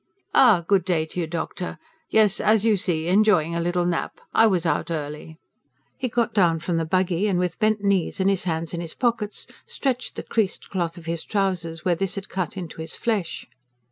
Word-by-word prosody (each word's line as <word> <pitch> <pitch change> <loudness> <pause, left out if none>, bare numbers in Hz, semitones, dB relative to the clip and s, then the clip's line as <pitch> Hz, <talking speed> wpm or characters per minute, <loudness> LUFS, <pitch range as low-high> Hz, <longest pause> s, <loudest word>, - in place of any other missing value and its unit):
"Ah, 205 -10 +5
good 195 -2 +3
day 170 -3 0
to 160 - -6
you, 165 - -1
doctor! 170 +2 -4 0.3
Yes, 215 -2 +4
as 215 0 +3
you 220 -2 +4
see, 170 -4 -1
enjoying 180 -4 +3
a - - 0
little 175 +1 0
nap. 175 -1 -2
I 225 - +6
was 180 -5 +1
out 165 - 0
early." 155 0 -5 0.6
He 265 - -2
got 235 0 0
down 175 -5 +3
from 170 +1 -2
the 165 - 0
buggy 185 +3 +1
and, 190 -3 +1
with 180 -1 -1
bent 215 -1 +1
knees 195 -3 +1
and 190 - +2
his 195 -2 +1
hands 165 -1 -2
in 170 - -3
his 165 -1 -5
pockets, 230 -4 -1 0.2
stretched 265 - -2
the - - -5
creased 215 -4 -2
cloth 170 -3 -2
of 170 - -11
his 165 0 -2
trousers, 180 -5 -2
where 180 - +3
this 185 +2 -1
had 200 0 -6
cut 185 -1 -3
into 170 -3 -6
his 160 0 -5
flesh. 210 -7 -2
180 Hz, 205 wpm, -24 LUFS, 165-205 Hz, 0.6 s, I